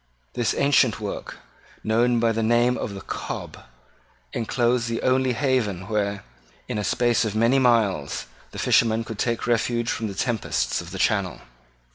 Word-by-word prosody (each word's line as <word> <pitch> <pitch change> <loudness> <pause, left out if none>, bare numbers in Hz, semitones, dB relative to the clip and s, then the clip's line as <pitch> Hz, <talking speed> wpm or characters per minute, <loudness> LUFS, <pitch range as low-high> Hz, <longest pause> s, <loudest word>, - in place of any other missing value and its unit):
This 120 -2 0
ancient 140 -5 +3
work, 105 -2 -6 0.5
known 120 +2 +2
by 115 0 +2
the 115 0 -1
name 120 +2 +3
of 100 - -4
the 95 - -7
Cob, - - -6 0.7
enclosed 120 +1 0
the 115 0 -3
only 130 0 +2
haven 115 -8 0
where, 100 -2 -1 0.4
in 105 - -2
a - - -2
space 120 +3 +2
of 110 -2 -2
many 115 +5 +3
miles, 110 - +1 0.2
the - - -11
fishermen 115 -1 +3
could 110 -2 -8
take 115 -2 -1
refuge 120 0 0
from 110 - -2
the 100 - -6
tempests 80 - -1
of 85 - -10
the 95 - -7
Channel. 100 -3 0
115 Hz, 160 wpm, -24 LUFS, 105-120 Hz, 0.7 s, ancient